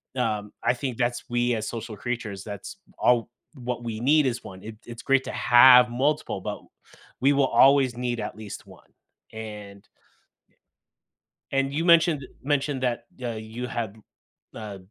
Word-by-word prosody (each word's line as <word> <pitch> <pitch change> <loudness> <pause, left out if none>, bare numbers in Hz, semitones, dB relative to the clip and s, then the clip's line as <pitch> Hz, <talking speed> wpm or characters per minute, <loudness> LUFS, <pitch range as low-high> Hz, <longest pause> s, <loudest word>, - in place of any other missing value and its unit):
um, 105 -4 -2
I - - +3
think 125 -2 -4
that's 120 -1 -1
we 120 0 +1
as 110 0 -3
social 115 -2 -6
creatures, 110 -5 -4
that's 100 - -8 0.2
all 120 -2 +3 0.3
what 125 -2 -5
we 110 -2 -4
need 145 +3 +4
is 120 -1 -3
1. 95 0 -10
I 110 +1 -7
it's 120 -1 -9
great 135 -1 +2
to - - -4
have 125 0 +7
multiple, 135 -4 -1
but - - -5 0.6
we 140 +2 +4
will 140 -1 +3
always 135 -3 +4
need 120 -1 -2
at - - -5
least 110 -2 -9
1. - - -16 0.5
And 105 -3 -9 1.6
and 135 0 0
you 165 +3 -1
mentioned 165 -4 +4 0.2
mentioned 140 -2 -1
that, 120 -1 -1
y 125 - -7
uh, 115 -2 -3
you 110 +3 -6
had, 115 -3 -4 0.6
uh, 105 -3 -7
120 Hz, 160 wpm, -25 LUFS, 110-135 Hz, 1.6 s, have